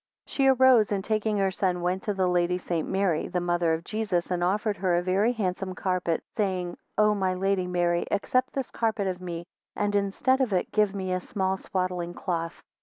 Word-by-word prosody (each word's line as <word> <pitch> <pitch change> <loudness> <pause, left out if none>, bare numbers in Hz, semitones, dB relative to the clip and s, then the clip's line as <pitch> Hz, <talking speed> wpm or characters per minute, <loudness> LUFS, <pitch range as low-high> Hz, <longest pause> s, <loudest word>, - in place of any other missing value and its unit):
2 - - -15
She 270 -1 +2
arose, 260 -5 +5
and 195 -2 0
taking 215 0 0
her 195 -1 +2
son, 185 -2 0
went 180 +2 0
to 205 - -2
the 190 -1 +1
Lady 180 0 +2
St. 170 -3 -2
Mary, 190 -5 +1
the 180 - -1
mother 175 -1 +1
of 160 +1 -1
Jesus, 200 -4 -2
and 175 -1 0
offered 205 +3 0
her 180 -1 +1
a 175 - +1
very 195 +6 +2
handsome 190 -4 -2
carpet, 180 -3 -1
saying, 185 -4 -1 0.2
O 210 0 +4
my 190 -2 0
Lady 190 0 0
Mary 175 -1 0
accept 255 +5 0
this 270 -2 -3
carpet 220 -3 -1
of 185 -1 -3
me, 175 -1 -5 0.3
and 205 0 0
instead 205 +7 +1
of 245 -6 +1
it 180 - 0
give 210 -2 +2
me 185 -2 -2
a 185 - 0
small 190 +1 -1
swaddling 180 -2 -3
cloth. 165 -2 -3
190 Hz, 205 wpm, -27 LUFS, 180-210 Hz, 0.3 s, arose